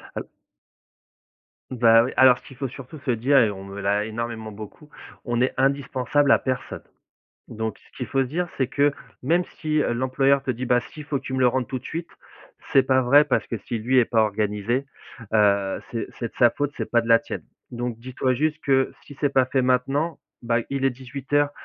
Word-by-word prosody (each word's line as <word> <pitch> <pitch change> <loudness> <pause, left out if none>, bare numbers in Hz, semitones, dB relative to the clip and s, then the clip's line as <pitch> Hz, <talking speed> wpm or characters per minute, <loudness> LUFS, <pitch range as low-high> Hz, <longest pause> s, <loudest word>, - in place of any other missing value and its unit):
Al - - -5 1.4
Bah 115 -2 +5
oui, 125 - -3
alors 130 -2 +6
qu'il 135 - -15
faut 135 - -2
surtout 135 +4 -10
se 130 -2 -1
dire 130 +5 +2
et 110 -5 +5
on 95 -1 -8
me 100 +1 -8
l'a 100 +1 0
énormément 110 0 -5
beaucoup. 110 +8 -11 0.3
On 120 -1 -1
est 130 +1 +1
indispensable 140 +1 +1
à - - +6
personne, 130 -1 -4 0.7
donc 110 0 -4
ce - - -25
qu'il 125 -4 -5
faut 135 +3 +1
se - - -5
dire, 175 +6 -2
c'est 130 - +2
que, 145 +2 +2 0.3
même 170 +7 +2 0.2
si, 155 -1 -1
heu, - - 0
l'employeur 135 +3 +2
te 135 - -7
dit: 125 +1 -2
«Bah, 125 0 +3
si, 150 +5 -11
il - - -8
faut 145 -1 -2
que - - -22
tu 130 - -6
me - - -1
le 125 - +5
rendes 130 0 0
tout 130 - -3
de 125 - -11
suite». 165 +1 -5 0.6
C'est 135 - +7
pas 130 0 +3
vrai 140 +4 +6
parce 135 - 0
que 115 - -4
si, 115 - -5
lui, 125 +4 +2
est 120 - +4
pas 110 -1 +2
organisé, 105 +5 -1 0.5
heu, 100 -2 +2
c'est 115 -2 -3
c'est 115 - -3
de - - -34
sa 120 -1 +7
faute, 145 +3 -2
c'est - - -4
pas 120 - +3
de 115 - -8
la 115 0 +6
tienne, - - -7 0.3
donc 120 -1 -4
dis-toi 130 +1 -1
juste 155 +4 0
que 135 -1 +2
si 145 - -13
c'est 145 - +2
pas 130 -2 +3
fait 130 0 0
maintenant, 135 +5 0 0.2
bah, 115 -1 +1
il 135 -1 -1
est - - +5
18:00, 140 +3 -1
130 Hz, 220 wpm, -24 LUFS, 115-140 Hz, 1.4 s, C'est